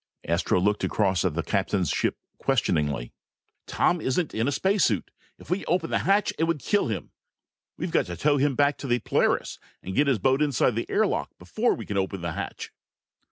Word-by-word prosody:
Astro 85 +2 +1
looked 105 +3 +1
across 95 -4 +1
at 90 -5 0
the 85 - -1
captain's 95 -1 0
ship - - 0 0.2
questioningly. 70 -5 0 0.5
"Tom 175 -2 +1
isn't 155 +5 -1
in 115 +3 0
a - - +1
space 190 +7 +2
suit. 105 -6 0 0.3
If - - -12
we 190 +2 0
open 170 -1 0
the - - +2
hatch 205 +1 +3
it 165 - +3
would 165 -1 0
kill 205 +8 +1
him. 110 -4 -4 0.7
We've - - -3
got - - +2
to 85 - -6
tow 145 -1 +2
him 140 0 +1
back 145 +1 +2
to 140 - -5
the 120 -1 +2
Polaris 115 - 0 0.2
and 95 - -5
get 145 +6 +3
his 135 -4 +3
boat 130 +6 +2
inside 140 -4 +2
the 115 +2 -3
air 215 - +3
lock - - -1
before 235 +3 0
we 115 - -7
can 100 - -3
open 95 -1 -2
the 85 -1 -3
hatch!" - - -6
125 Hz, 205 wpm, -26 LUFS, 95-155 Hz, 0.7 s, hatch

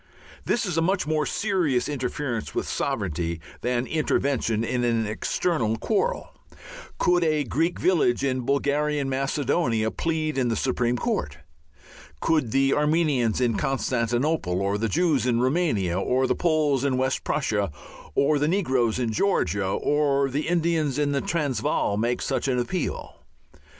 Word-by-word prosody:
This 240 - +1
is 175 -4 -1
a - - +2
much 185 +3 +1
more 155 -1 0
serious 180 - 0
interference 130 -3 -3
with - - -1
sovereignty 85 -2 -2 0.2
than 125 +1 0
intervention 135 -7 0
in 120 +1 -1
an 115 -2 +1
external 115 +2 -1
quarrel. 225 - -1 0.7
Could 175 -1 +2
a 155 -2 +2
Greek 160 +7 -1
village 150 -9 +2
in 130 -2 0
Bulgarian 140 +2 0
Macedonia 130 -4 0
plead 155 -3 -1
in 125 - +1
the 115 - 0
Supreme 125 -1 0
Court? 75 - -2 0.8
Could 155 - +1
the 135 +3 +2
Armenians 150 -7 +1
in 120 -3 +1
Constantinople, 125 - 0
or 100 +1 0
the 115 0 0
Jews 155 -5 +1
in 120 -2 +2
Roumania, 125 - +1
or 130 +6 +1
the - - +2
Poles 155 -6 +1
in 135 -2 +1
West 130 0 0
Prussia, 105 - -1 0.4
or 145 +1 +3
the 150 - +1
negroes 130 - +1
in 120 -3 -1
Georgia, 100 - +1
or 140 +5 +1
the 145 +4 -2
Indians 165 -5 +1
in 145 -1 +1
the 140 -1 0
Transvaal 145 -9 0
make 120 +3 0
such - - -1
an 130 -2 +1
appeal? 145 +8 -3
135 Hz, 145 wpm, -25 LUFS, 120-155 Hz, 0.8 s, or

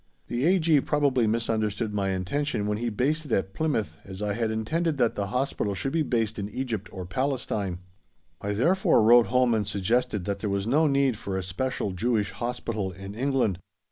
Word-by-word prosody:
The 120 +4 0
A.G. 165 -5 +4
probably 135 -6 +2
misunderstood 110 -1 -1
my 100 -1 0
intention 105 +6 -1
when 105 0 -1
he 120 0 -1
based 145 +9 0
it - - -10
at 95 -2 0
Plymouth, 110 - -1
as 95 -1 -9
I 105 -1 -1
had 115 +1 -1
intended 150 +9 -1
that 120 -3 +2
the 100 -1 -2
Hospital 125 -3 -1
should 135 +7 -2
be 165 - +2
based 115 -6 0
in 100 0 -3
Egypt 110 -3 -4
or 95 -2 -6
Palestine. 110 -4 -2 0.6
I 100 +1 -2
therefore 170 - +3
wrote 120 0 +7
home 125 +1 +3
and 105 -3 0
suggested 105 0 0
that 100 -1 -2
there 105 - -2
was 100 0 -1
no 150 +7 +3
need 140 -4 +2
for 95 -1 -3
a 95 - -2
special 100 +3 -2
Jewish 105 +2 0
Hospital 115 -5 -3
in 95 +2 -8
England. 125 -6 0
110 Hz, 190 wpm, -27 LUFS, 100-130 Hz, 0.6 s, wrote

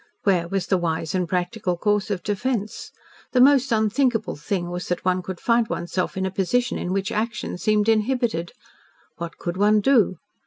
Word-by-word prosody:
Where 180 -4 +2
was 195 0 -1
the 190 - +1
wise 165 -2 -2
and 180 -2 -1
practical 180 0 -1
course 210 +2 +1
of 190 -4 -2
defence? 210 +1 -2 0.4
The 255 - +3
most 270 0 +5
unthinkable 225 +1 +1
thing 175 +4 -3
was 180 0 -4
that 180 0 -3
one 185 0 +2
could 180 0 -6
find 230 -1 +2
one's 175 - -4
self 185 0 -1
in 190 - 0
a 190 - -2
position 240 +6 0
in 180 - -3
which 195 0 -1
action 225 -3 -3
seemed 210 +1 +2
inhibited. 220 -6 +1 0.7
What 170 -1 -6
could 175 +1 -4
one 210 +2 +4
do? 210 -5 +3
195 Hz, 185 wpm, -23 LUFS, 180-225 Hz, 0.7 s, most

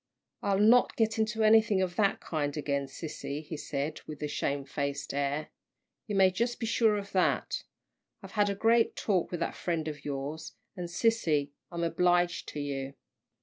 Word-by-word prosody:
"I'll 200 -1 +1
not 225 +5 +5
get 225 0 +1
into 220 0 +1
anything 215 -2 +5
of 185 -2 -1
that 200 -3 +2
kind 145 -2 -2
again, 140 -2 -1
sissy," 150 +1 -6
he 155 - -5
said, 145 +1 -3
with 150 -1 -7
a - - 0
shamefaced 140 0 -2
air. 140 +2 -1 0.6
"You 210 - -2
may 190 -1 +5
just 235 +6 -1
be 230 - -2
sure 220 -1 +3
of 200 0 -6
that. 185 -2 +1 0.6
I've - - -9
had 205 -1 +2
a 200 - -1
great 225 +3 +3
talk 190 -5 0
with 175 -2 -4
that - - -1
friend 165 -3 -2
of 150 -2 -6
yours 145 +3 -5 0.2
and 175 -2 -5
sissy, 170 -8 +1 0.2
I'm 170 -1 -3
obliged 175 +1 +2
to 150 - -6
you." 140 -1 -4
170 Hz, 175 wpm, -30 LUFS, 145-205 Hz, 0.6 s, not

